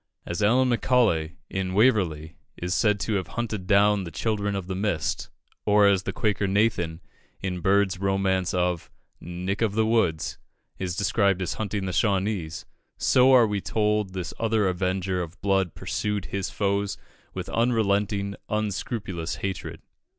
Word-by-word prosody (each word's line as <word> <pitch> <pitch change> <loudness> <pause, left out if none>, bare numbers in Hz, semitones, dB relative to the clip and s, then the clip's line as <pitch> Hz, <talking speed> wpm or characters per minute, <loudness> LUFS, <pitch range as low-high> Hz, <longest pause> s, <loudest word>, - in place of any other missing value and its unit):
As 85 +4 -3
Allan 125 +5 +4
Macaulay, 110 -10 +2
in 95 -1 -3
"Waverley," 90 -9 +2 0.2
is 90 0 -2
said 105 -2 +2
to 110 - -1
have 95 - -3
hunted 110 -6 -3
down 100 0 +4
the 85 - -6
Children 100 +3 -1
of 95 -2 -3
the 95 - -4
Mist, 95 -4 -1 0.3
or 105 0 +5
as 100 -2 +3
the - - -3
Quaker 105 -2 0
Nathan, 95 -5 +1 0.4
in 90 -1 -3
Bird's 95 0 +2
romance 95 -2 +1
of 90 -2 -1 0.3
"Nick 90 +5 -4
of 110 -3 +1
the 110 +1 +2
Woods," 110 -9 +1 0.4
is 90 -2 -2
described 100 -1 +2
as 95 - -2
hunting 105 -2 -3
the 95 - -2
Shawnese, 95 -6 0 0.3
so 130 -1 +5
we 105 -1 -1
are - - -9
told 105 -2 0
this 90 -4 -4
other 110 -3 +2
avenger 90 0 -1
of 85 +2 -7
blood 95 -3 +1
pursued 105 -2 -2
his 100 -2 -3
foes 100 0 -1 0.4
with - - -4
unrelenting, 100 -4 +1
unscrupulous 100 -6 -3
hatred. 95 -2 -5
100 Hz, 150 wpm, -26 LUFS, 90-105 Hz, 0.4 s, or